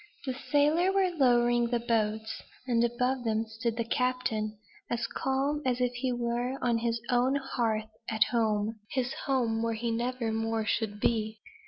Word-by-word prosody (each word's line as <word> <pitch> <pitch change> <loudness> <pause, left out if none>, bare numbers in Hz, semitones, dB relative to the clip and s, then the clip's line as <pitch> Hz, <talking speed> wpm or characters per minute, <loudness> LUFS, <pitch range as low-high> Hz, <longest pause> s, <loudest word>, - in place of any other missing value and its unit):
The 260 - -1
sailors 300 +7 +2
were 380 -2 +3
lowering 240 -5 +3
the 240 0 0
boats; 220 -2 -1 0.2
and 235 -2 +2
above 250 +2 0
them 225 -1 0
stood 225 +1 -3
the 230 - +1
captain, 230 -3 -1 0.3
as 240 0 -1
calm 275 +3 -1
as 250 -1 0
if 250 -1 +1
he 250 +1 -1
were 240 +2 -1
on 235 -2 +1
his 230 0 0
own 250 +2 +3
hearth 235 -6 0 0.2
at 220 -1 +4
home 220 -2 +1
his 255 -1 -1
home 235 -5 +1
where 230 0 0
he 230 +1 -2
never 240 0 -1
more 225 0 -1
should 215 -2 -1
be. 220 0 0
240 Hz, 165 wpm, -30 LUFS, 225-255 Hz, 0.3 s, at